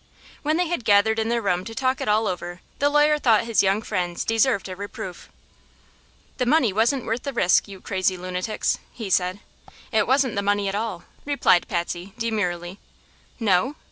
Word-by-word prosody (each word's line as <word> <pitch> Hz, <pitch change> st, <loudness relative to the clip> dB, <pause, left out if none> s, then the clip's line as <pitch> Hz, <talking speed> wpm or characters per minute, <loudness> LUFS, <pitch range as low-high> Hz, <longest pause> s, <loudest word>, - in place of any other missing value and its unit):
When 310 Hz, +2 st, 0 dB
they 360 Hz, -, +2 dB
had 340 Hz, -7 st, -2 dB
gathered 220 Hz, +1 st, +4 dB
in 220 Hz, 0 st, -1 dB
their 235 Hz, -1 st, 0 dB
room 180 Hz, -2 st, 0 dB
to 225 Hz, +3 st, -8 dB
talk 260 Hz, +1 st, 0 dB
it -, -, -3 dB
all 215 Hz, +1 st, +3 dB
over 175 Hz, -1 st, -4 dB, 0.2 s
the 285 Hz, -, +3 dB
lawyer 295 Hz, +1 st, +3 dB
thought 230 Hz, -5 st, +4 dB
his 230 Hz, -1 st, +2 dB
young 195 Hz, +3 st, +1 dB
friends 175 Hz, -3 st, -2 dB
deserved 225 Hz, -2 st, +2 dB
a 185 Hz, -, -6 dB
reproof. 190 Hz, -2 st, -8 dB, 1.1 s
"The 250 Hz, -, +1 dB
money 255 Hz, -7 st, +3 dB
wasn't 235 Hz, +5 st, +1 dB
worth 230 Hz, +1 st, -2 dB
the 280 Hz, -, -4 dB
risk, 190 Hz, -7 st, +3 dB
you 195 Hz, -2 st, -10 dB
crazy 185 Hz, -1 st, -1 dB
lunatics!" 185 Hz, +4 st, -2 dB
he 215 Hz, -5 st, -6 dB
said. 185 Hz, +2 st, +1 dB, 0.5 s
"It 220 Hz, -3 st, +2 dB
wasn't 260 Hz, -2 st, +2 dB
the 200 Hz, -, -1 dB
money 205 Hz, 0 st, +1 dB
at 195 Hz, -, -2 dB
all," 205 Hz, -4 st, -3 dB, 0.2 s
replied 280 Hz, -11 st, +2 dB
Patsy, 175 Hz, +2 st, -4 dB
demurely. 190 Hz, -5 st, -2 dB, 0.6 s
"No?" 220 Hz, +5 st, +2 dB
210 Hz, 180 wpm, -23 LUFS, 185-240 Hz, 1.1 s, gathered